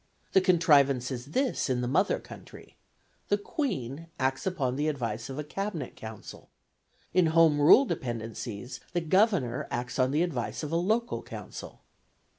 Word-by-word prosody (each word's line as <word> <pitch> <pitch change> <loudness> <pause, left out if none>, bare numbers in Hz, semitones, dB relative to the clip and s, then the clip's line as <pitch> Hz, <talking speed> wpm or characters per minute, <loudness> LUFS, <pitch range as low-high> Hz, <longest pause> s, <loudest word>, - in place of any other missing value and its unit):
The 190 - +6
contrivance 145 -8 +4
is 125 0 -5
this 255 - 0
in 125 -1 +1
the 125 - -1
mother 185 +10 +2
country: - - -13 0.5
the 205 - +2
Queen 165 - -3
acts 130 +6 -1
upon 140 -9 -1
the 150 +3 0
advice 120 -5 -3
of 135 - -6
a 150 - -3
cabinet 165 - -4
council; 110 -1 -10 0.6
in 180 -2 +4
home 160 -2 +4
rule 205 - +8
dependencies 115 - -5
the 175 - +1
Governor 165 - +2
acts 125 +2 -4
on 130 0 +3
the 150 +5 +2
advice 125 -8 -3
of 150 - -4
a - - 0
local 220 +8 0
council. - - -9
145 Hz, 155 wpm, -28 LUFS, 125-180 Hz, 0.6 s, rule